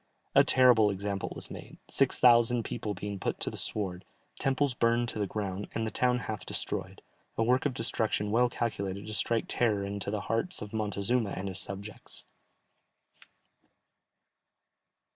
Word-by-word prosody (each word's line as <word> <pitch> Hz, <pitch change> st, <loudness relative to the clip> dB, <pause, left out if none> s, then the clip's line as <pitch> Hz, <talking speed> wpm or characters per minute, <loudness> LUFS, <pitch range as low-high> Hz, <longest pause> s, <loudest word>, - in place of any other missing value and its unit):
A -, -, +7 dB
terrible 125 Hz, -5 st, +6 dB
example 100 Hz, 0 st, -3 dB
was -, -, -4 dB
made, -, -, -9 dB
six 135 Hz, -2 st, +2 dB
thousand 120 Hz, -1 st, +5 dB
people 105 Hz, -1 st, -4 dB
being 100 Hz, +2 st, -5 dB
put -, -, -2 dB
to -, -, -1 dB
the -, -, -8 dB
sword, 95 Hz, -4 st, -3 dB, 0.4 s
temples 135 Hz, 0 st, +1 dB
burned 120 Hz, 0 st, +2 dB
to 110 Hz, -, -4 dB
the 100 Hz, -, 0 dB
ground, 100 Hz, -1 st, -4 dB
and 115 Hz, -, 0 dB
the 110 Hz, -, -3 dB
town 125 Hz, -1 st, +2 dB
half 110 Hz, -2 st, -5 dB
destroyed, -, -, -3 dB, 0.3 s
a 115 Hz, -, +3 dB
work 125 Hz, +5 st, +3 dB
of 130 Hz, -, -5 dB
destruction 110 Hz, -3 st, -1 dB
well 120 Hz, +2 st, +4 dB
calculated 100 Hz, -5 st, -3 dB
to 110 Hz, -, -6 dB
strike 115 Hz, +2 st, 0 dB
terror 105 Hz, -5 st, +1 dB
into 100 Hz, 0 st, -3 dB
the 105 Hz, 0 st, -2 dB
hearts 115 Hz, -, -1 dB
of 105 Hz, 0 st, -8 dB
Montezuma 105 Hz, +1 st, 0 dB
and 95 Hz, +1 st, -3 dB
his 95 Hz, 0 st, 0 dB
subjects. 100 Hz, +2 st, -5 dB
110 Hz, 160 wpm, -30 LUFS, 100-120 Hz, 0.4 s, A